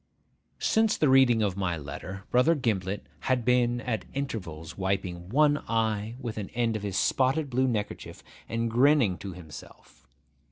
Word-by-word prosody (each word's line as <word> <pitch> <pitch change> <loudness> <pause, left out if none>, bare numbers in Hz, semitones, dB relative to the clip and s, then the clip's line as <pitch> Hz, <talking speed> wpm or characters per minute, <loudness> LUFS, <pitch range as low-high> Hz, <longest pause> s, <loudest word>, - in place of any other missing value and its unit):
Since 220 -1 +2
the 150 - +3
reading 130 -4 +5
of 100 -3 0
my 95 -3 -1
letter, 90 +6 -7
Brother 125 +7 +4
Gimblet 105 - -2 0.2
had 125 -3 +1
been 120 -1 +2
at 115 -4 -2
intervals 85 - -5
wiping 95 -2 -2
one 145 +4 +3
eye 110 -1 0
with 115 -4 -5
an 100 - -5
end 115 -2 +1
of 110 - -3
his 100 -2 -3
spotted 135 +6 +1
blue 130 +2 +2
neckerchief, 110 -5 -4 0.3
and 115 +1 -1
grinning 125 -6 +4
to 95 -2 -6
himself. 80 -5 -13
115 Hz, 155 wpm, -28 LUFS, 95-130 Hz, 0.3 s, reading